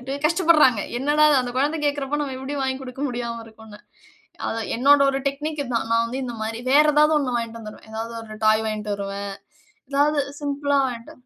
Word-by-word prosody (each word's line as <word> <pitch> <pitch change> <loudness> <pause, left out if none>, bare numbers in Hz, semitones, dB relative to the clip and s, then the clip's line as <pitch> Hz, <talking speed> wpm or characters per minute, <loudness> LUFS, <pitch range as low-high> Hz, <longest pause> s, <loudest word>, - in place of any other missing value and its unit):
வந்துட்டு 265 +2 -5
கஷ்டப்பட்றாங்க. 310 - +4 0.2
"என்னடா, 295 +3 +3 0.2
அந்த 250 -1 -4
கொழந்தை 300 +4 0
கேட்கிறப்போ 290 0 -1
நம்ம 275 -2 -4
எப்படி 265 +2 -5
வாங்கிக் 265 0 -2
குடுக்க 260 +1 -8
முடியாம 235 -2 -4
இருக்கும்னு" 220 -1 -14 0.7
அதான் 225 0 -3
என்னோட 280 +4 +5
ஒரு 270 - -1
டெக்னிக் 300 +2 -4
இது 255 -3 -6
தான். 225 -1 -1
நான் 230 0 +3
வந்து 245 +3 -5
இந்த 240 -1 -5
மாரி 225 +1 -3
வேற 295 +2 +7
ஏதாவது 300 +1 +5
1 260 -4 -2
வாங்கிட்டு 230 -1 -4
வந்துருவேன். 215 0 -11
ஏதாவது 225 +1 -5
ஒரு 215 -1 -10
டாய் 215 0 +4
வாங்கிட்டு 215 -1 -3
வருவேன். 200 0 -5 0.6
எதாவது 290 +1 +2 0.2
சிம்பிள்ளா 285 0 -1
வாங்கிட்டு 235 -2 -7
255 Hz, 185 wpm, -23 LUFS, 225-285 Hz, 0.7 s, வேற